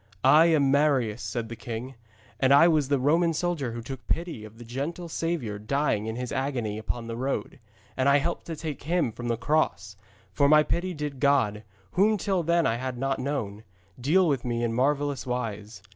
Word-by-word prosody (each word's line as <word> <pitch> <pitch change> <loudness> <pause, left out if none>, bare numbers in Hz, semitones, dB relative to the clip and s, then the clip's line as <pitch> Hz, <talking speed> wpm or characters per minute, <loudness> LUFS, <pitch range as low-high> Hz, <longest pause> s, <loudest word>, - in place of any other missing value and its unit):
'I 155 +2 +7
am 145 -5 +3
Marius,' 135 -6 +2
said 110 +3 -3
the 115 - -7
king, 120 +3 -6 0.5
'and 130 0 +3
I 145 +4 +7
was 155 -5 +2
that 140 - +3
Roman 165 +5 +2
soldier 155 -8 -1
who 115 0 -6
took 130 +1 -8
pity 165 -9 -2
of 110 +1 -12
the 120 - -11
gentle 145 +9 -4
Saviour 160 -11 -3
dying 110 -1 0
in 110 - -3
His 125 0 -4
agony 130 -6 -2
upon 115 +2 -4
the 115 0 -5
rood. 135 +3 -3 0.4
And 130 +1 +2
I 140 - +6
helped 170 +5 -2
to 165 - -4
take 155 -2 -6
Him 165 -5 0
from 120 +2 -7
the 115 -1 0
cross. 115 -5 0 0.4
For 140 -1 +3
my 150 0 +7
pity 175 +3 -2
did 145 -3 -5
God, 130 -7 +2 0.3
whom 210 +3 +3
till 190 -1 0
then 170 0 +2
I 115 - +1
had 130 0 -4
not 135 +1 -1
known, 115 -7 -3 0.4
deal 170 +9 +3
with 140 -5 0
me 120 -1 -2
in 115 -1 0
marvellous 140 +2 0
wise. 110 -4 -4
135 Hz, 200 wpm, -27 LUFS, 115-155 Hz, 0.5 s, I